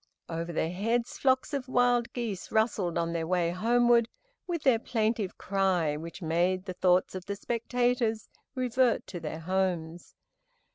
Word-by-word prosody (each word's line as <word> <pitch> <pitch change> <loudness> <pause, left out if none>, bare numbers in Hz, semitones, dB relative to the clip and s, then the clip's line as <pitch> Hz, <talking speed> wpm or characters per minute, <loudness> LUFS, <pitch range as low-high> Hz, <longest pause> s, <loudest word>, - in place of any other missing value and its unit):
Over 165 +1 -3
their 160 0 -1
heads 230 +6 -1
flocks 260 +1 +2
of 270 -2 -2
wild 245 -2 +2
geese 225 -6 -4
rustled 215 -6 +1
on 170 0 -1
their 165 -1 -2
way 175 -1 +1
homeward 235 +4 +3 0.4
with 340 -4 -3
their 255 -5 +4
plaintive 220 -4 -1
cry, 185 -6 +1
which 165 +4 -8
made 175 +3 +1
the 185 - -4
thoughts 180 0 +2
of 185 0 -7
the 200 - -2
spectators 235 0 0 0.3
revert 255 -1 +1
to 180 - -7
their 160 0 -5
homes. 175 -2 -2
200 Hz, 150 wpm, -29 LUFS, 175-240 Hz, 0.4 s, their